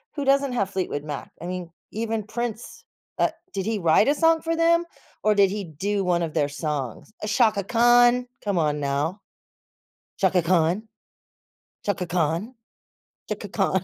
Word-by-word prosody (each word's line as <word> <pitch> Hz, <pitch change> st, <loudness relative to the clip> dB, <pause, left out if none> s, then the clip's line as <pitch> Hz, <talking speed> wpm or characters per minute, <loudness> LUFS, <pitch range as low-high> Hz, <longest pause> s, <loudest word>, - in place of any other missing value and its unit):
who 285 Hz, -2 st, -2 dB
doesn't 275 Hz, -1 st, +3 dB
have 200 Hz, -6 st, 0 dB
Fleetwood 180 Hz, -6 st, -2 dB
Mac? 150 Hz, -2 st, -6 dB
I 170 Hz, -, -7 dB
mean, 180 Hz, -1 st, -5 dB, 0.2 s
even 220 Hz, 0 st, -2 dB
Prince, 235 Hz, +1 st, -5 dB, 0.4 s
uh, -, -, +4 dB, 0.2 s
did 195 Hz, -2 st, -2 dB
he 225 Hz, -1 st, 0 dB
write 170 Hz, +4 st, +4 dB
a 290 Hz, -, +3 dB
song 325 Hz, 0 st, +3 dB
for 330 Hz, 0 st, -1 dB
them, 335 Hz, +1 st, +4 dB, 0.4 s
or 215 Hz, -1 st, +3 dB
did 195 Hz, -2 st, +4 dB
he 205 Hz, 0 st, -3 dB
do 195 Hz, +5 st, -2 dB
one 175 Hz, -2 st, +1 dB
of 160 Hz, -, -3 dB
their 145 Hz, 0 st, +1 dB
songs? 145 Hz, -, -4 dB
Uh, -, -, -2 dB
Chaka 215 Hz, -1 st, +3 dB
Khan 240 Hz, +3 st, +4 dB, 0.2 s
come 200 Hz, -3 st, 0 dB
on 150 Hz, -2 st, +1 dB
now. 145 Hz, +7 st, -1 dB, 1.0 s
Chaka 185 Hz, -2 st, +3 dB
Khan. 175 Hz, +5 st, +1 dB, 1.0 s
Chaka 185 Hz, -3 st, -1 dB
Khan. 175 Hz, -, -1 dB, 0.8 s
Chaka -, -, -4 dB
Khan. -, -, +1 dB
200 Hz, 160 wpm, -24 LUFS, 165-235 Hz, 1.0 s, uh